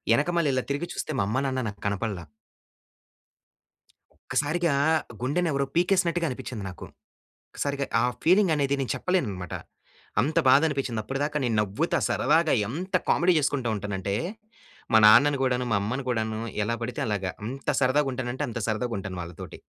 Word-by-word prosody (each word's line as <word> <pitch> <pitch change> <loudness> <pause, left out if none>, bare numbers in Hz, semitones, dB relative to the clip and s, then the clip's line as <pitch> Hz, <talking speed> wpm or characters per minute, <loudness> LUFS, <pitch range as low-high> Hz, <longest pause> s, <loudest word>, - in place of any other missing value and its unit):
ఎనకమాల 170 +5 +1
ఇలా 130 -1 0
తిరిగి 145 +5 -2
చూస్తే - - -4
మా - - +2
అమ్మా, 110 +6 0
నాన్న 130 -1 -1
నాకు 100 -1 -7
కనపడల. 100 -1 -2 2.1
ఒక్కసారిగా, 160 +2 +1 0.5
గుండెని 165 +7 0
ఎవరో 140 -1 0
పీకేసినట్టుగా 175 -1 +2
అనిపించింది 125 -4 -6
నాకు. 90 -3 -8 0.6
ఒక్కసారిగా 140 -1 -2
ఆ - - +2 0.2
ఫీలింగ్ 185 0 +4
అనేది 140 -1 +1
నేను 135 - -1
చెప్పలేనన్నమాట. 105 - -2 0.7
అంత 150 +7 -1
బాధ 135 +2 +7
అనిపించింది. 135 -7 -2
అప్పటిదాకా 145 +5 -2
నేను 120 -3 0
నవ్వుతా 100 0 0
సరదాగా 165 -1 +3
ఎంత 180 - -4
కామెడీ 175 0 +4
చేసుకుంటూ 140 -4 0
ఉంటాను 105 0 -4
అంటే, 100 +1 -2 0.8
మా 110 - +8
నాన్నను 135 +6 +6
కూడాను, 125 -1 0
మా - - +4
అమ్మను 125 +6 -3
కూడాను 110 -2 -1 0.3
ఎలా 115 +2 0
పడితే 120 +1 -4
అలాగ, 105 -3 -1 0.2
ఎంత 130 +4 -2
సరదాగా 135 +2 +3
ఉంటానంటే, 130 +3 -3
అంత 115 0 -4
సరదాగా 115 +2 -1
ఉంటాను 95 -2 -6
వాళ్ళతోటి. 85 -1 -9
130 Hz, 150 wpm, -26 LUFS, 110-150 Hz, 2.1 s, మా